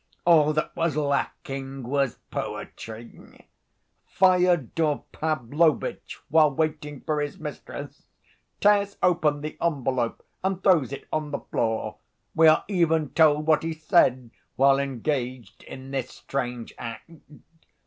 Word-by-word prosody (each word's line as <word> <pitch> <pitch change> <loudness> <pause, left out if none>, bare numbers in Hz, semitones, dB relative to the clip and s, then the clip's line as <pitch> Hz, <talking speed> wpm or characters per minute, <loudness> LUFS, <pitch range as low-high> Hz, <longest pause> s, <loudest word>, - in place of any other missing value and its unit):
All 155 -3 +5
that 155 +1 -2
was 165 -3 0
lacking 135 -2 -2
was 135 +1 0 0.2
poetry. 115 +1 -8 0.6
Fyodor 175 -5 +2
Pavlovitch, 155 +1 0
while 155 0 +5
waiting 150 -1 -3
for 150 -1 -1
his 145 -1 -4
mistress, - - -8 0.5
tears 200 -1 +3
open 155 -5 +2
the 155 +1 -5
envelope 130 -7 -1 0.2
and 190 -1 -1
throws 165 -10 +4
it 140 - -7
on 155 -1 -1
the 140 - -4
floor. 110 -1 -2 0.4
We 160 0 +5
are 155 - +5
even 165 -6 +1
told 150 -2 +4
what 155 -1 +4
he 165 0 -3
said 130 -6 +2 0.2
while 135 +1 +4
engaged 130 -3 -3
in 135 0 -10
this 135 -2 -2
strange 125 -3 -5
act. 115 +7 -7
150 Hz, 120 wpm, -25 LUFS, 135-160 Hz, 0.6 s, All